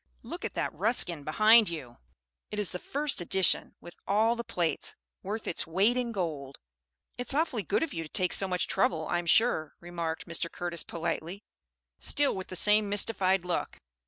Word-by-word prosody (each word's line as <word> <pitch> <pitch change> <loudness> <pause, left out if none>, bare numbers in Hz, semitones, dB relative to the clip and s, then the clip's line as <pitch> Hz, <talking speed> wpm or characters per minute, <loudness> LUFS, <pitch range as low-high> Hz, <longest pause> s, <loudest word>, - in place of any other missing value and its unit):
Look - - -8
at - - -5
that - - -2
Ruskin 180 -5 +1
behind 215 +7 +5
you. 135 -8 -8 0.5
It 210 - -6
is 210 -3 0
the 180 - -5
first 285 -2 -1
edition, 190 +2 +1
with 175 - -12
all 220 +4 +3
the 235 - -5
plates, 170 -7 -2 0.3
worth 215 +3 -5
its 165 - -1
weight 195 +8 +2
in 245 -2 -1
gold." 155 -9 -4 0.6
"It's 250 +2 +3
awfully 290 -7 0
good 200 +8 0
of 325 - -4
you 165 - -3
to 160 - -8
take 180 +2 +1
so 195 - +1
much 180 -1 -1
trouble, 160 -2 0
I'm 175 0 -1
sure," 160 -6 +2
remarked 170 -2 -5
Mr. 170 0 -2
Curtis 175 -1 -4
politely, 170 +3 -4 0.6
still 290 -1 +1
with 190 -1 -6
the 185 - -6
same 210 +3 +5
mystified 195 -3 +2
look. 180 -1 -3
185 Hz, 180 wpm, -29 LUFS, 170-215 Hz, 0.6 s, behind